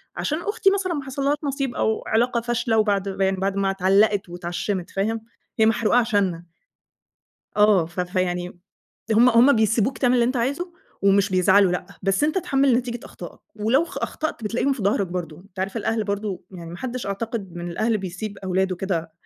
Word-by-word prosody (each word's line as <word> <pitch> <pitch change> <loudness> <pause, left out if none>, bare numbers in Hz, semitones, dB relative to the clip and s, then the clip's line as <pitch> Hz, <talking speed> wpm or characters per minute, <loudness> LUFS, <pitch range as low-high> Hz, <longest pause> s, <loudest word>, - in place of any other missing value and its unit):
عشان 305 +2 -2
أختي 415 0 +2
مثلًا 380 -3 0
ما 285 -3 -3
حصلهاش 275 +2 -1
نصيب 275 -2 -2
أو 220 - 0
علاقة 235 +1 +1
فاشلة 235 -1 0
وبعد 200 -2 +1
ما 195 0 0
يعني 190 0 0
بعد 195 +1 -1
ما 195 -1 +1
اتعلّقت 195 0 +2
واتعشمت، 175 +2 -3
فاهم، 220 +3 -1 0.4
هي 220 - +6
محروقة 225 +1 +3
عشانّا. 195 -7 +1 1.1
آه 205 -5 +5
ف 175 +2 -5
فيعني 180 -1 -2 0.5
هُم 235 +3 +6
هُم 245 +4 +6
بيسيبوك 220 +3 +1
تعمل 250 -1 +3
اللي 240 -1 +4
أنت 255 +2 0
عايزه 285 +9 -2 0.3
ومش 200 0 +3
بيزعلوا 185 0 +4
لأ، 180 - -3 0.2
بس 195 +8 +2
أنت 310 +4 0
اتحمِّل 275 -6 +2
نتيجة 240 -1 -3
أخطائك - - -10 0.2
ولو 235 +9 +2
خ - - -7
أخطأت 310 -7 -4
بتلاقيهم 250 +6 0
في 250 -6 -4
ضهرك 200 0 +1
برضه 170 -3 -5
أنت 190 +1 -18
عارف 190 +3 -2
الأهل 220 0 -1
برضه 200 -1 -3
يعني 170 -3 -9
ما 175 - -7
حدّش 255 -1 -5
أعتقد 200 -2 -4
من 175 0 -5
الأهل 220 +5 0
بيسيب 195 +3 -6
أولاده 190 0 0
كده 170 -4 -3
210 Hz, 180 wpm, -23 LUFS, 190-240 Hz, 1.1 s, هي